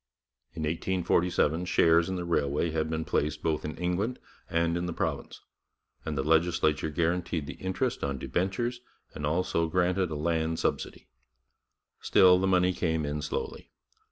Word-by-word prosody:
In 80 - -4
1847 85 0 +1
shares 85 0 +4
in 95 - -2
the 90 -1 -3
railway 80 -1 0
had 80 0 -1
been 80 0 -2
placed 75 0 -1
both 80 -2 0
in 75 - -5
England 90 +8 -1 0.3
and 85 0 +1
in 85 0 -2
the 85 - -3
province, - - -3 0.6
and 75 -2 -3
the 65 - 0
legislature 80 -1 +2
guaranteed 85 0 -1
the - - -6
interest 95 0 -2
on 70 -1 -1
debentures 110 - -2 0.3
and 75 - -3
also 85 +1 0
granted 90 +2 +1
a 80 - -4
land 80 +1 0
subsidy. - - -2 0.9
Still, 90 -1 +5
the 95 - +1
money 90 -1 +3
came 80 -3 -1
in 75 +1 -3
slowly. - - -4
85 Hz, 155 wpm, -28 LUFS, 80-90 Hz, 0.9 s, Still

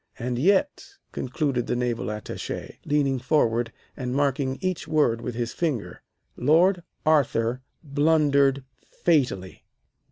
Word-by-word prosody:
And 120 0 -3
yet," 200 - +2 0.3
concluded 130 -1 -2
the - - 0
Naval 120 -2 -1
Attache, 105 0 -6
leaning 140 -3 +1
forward 120 -4 +1 0.2
and 125 -1 -3
marking 135 -1 0
each 185 -2 -2
word 120 -7 +2
with 125 - -5
his 120 -1 -3
finger, 150 -10 -3 0.3
"Lord 175 +7 +3 0.2
Arthur 130 -5 +2 0.2
blundered 140 -2 +3 0.3
fatally. 125 - 0
135 Hz, 115 wpm, -25 LUFS, 120-155 Hz, 0.3 s, Lord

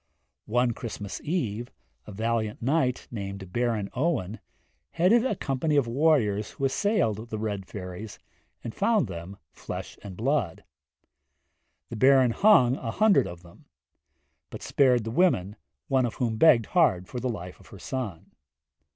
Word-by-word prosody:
One 120 +2 +2
Christmas 105 -3 -6
eve 120 - -2 0.4
a - - -8
valiant 110 +1 -2
knight 130 0 0
named 100 -4 -7
Baron 115 -4 0
Owen 125 - -1 0.5
headed 210 +8 +4
a 255 -5 0
company 145 0 -1
of 140 -3 +3
warriors 115 -6 +1
who 135 - -3
assailed 135 - 0
the 110 - -4
Red 100 -3 -4
Fairies, 95 +2 -8 0.5
and 115 - -6
found 225 -3 +2
them 85 +4 -8
flesh - - -8
and 95 -3 -9
blood. 125 - -1 1.3
The 115 - -6
Baron 130 0 +5
hung 130 - +5
a 115 - -5
hundred 215 - +3
of 85 0 -10
them; 85 -1 -18 0.8
but - - -9
spared 125 -4 +3
the 115 - -4
women, 110 - +2 0.3
one 130 -2 +2
of 115 - -7
whom 120 -3 -1
begged 120 -5 +5
hard 95 - +3
for 125 - -5
the 130 +1 -2
life 90 -5 -7
of 95 - -18
her 100 - -12
son. 110 -6 -6
115 Hz, 150 wpm, -27 LUFS, 100-135 Hz, 1.3 s, Baron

